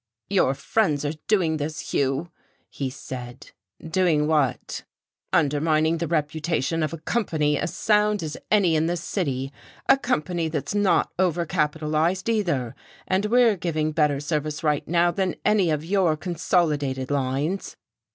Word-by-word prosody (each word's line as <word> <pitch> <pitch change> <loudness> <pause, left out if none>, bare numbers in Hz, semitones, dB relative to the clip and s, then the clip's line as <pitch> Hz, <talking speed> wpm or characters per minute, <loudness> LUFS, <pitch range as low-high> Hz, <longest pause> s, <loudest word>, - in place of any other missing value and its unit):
"Your 160 -9 +3
friends 150 -6 0
are 145 - -1
doing 175 -7 +2
thus, 150 0 -5
Hugh," 140 +5 0 0.4
he 135 -2 -3
said. 125 -1 -8 0.4
"Doing 160 -4 +2
what?" 150 -5 0 0.5
"Undermining 155 +2 +2
the 170 - -1
reputation 160 0 -1
of 155 -2 0
a 165 - -5
company 155 -6 0
as 155 - -2
sound 210 -2 +2
as 155 -1 -4
any 195 -6 +4
in 160 +1 +2
this 175 0 -2
city, 135 -9 -2 0.3
a 270 - +5
company 175 - -1
that's 155 +3 -3
not 205 -2 +2
overcapitalized, 165 +1 0
either. 170 - 0 0.3
And 190 +3 +1
we're 235 -1 +4
giving 160 -3 -1
better 150 -3 +2
service 150 0 -3
right 150 -2 0
now 175 +1 +3
than 190 -1 -1
any 210 -5 +3
of 155 0 -1
your 180 -4 +2
consolidated 150 -6 0
lines."... 140 +7 -1
160 Hz, 140 wpm, -24 LUFS, 150-180 Hz, 0.5 s, a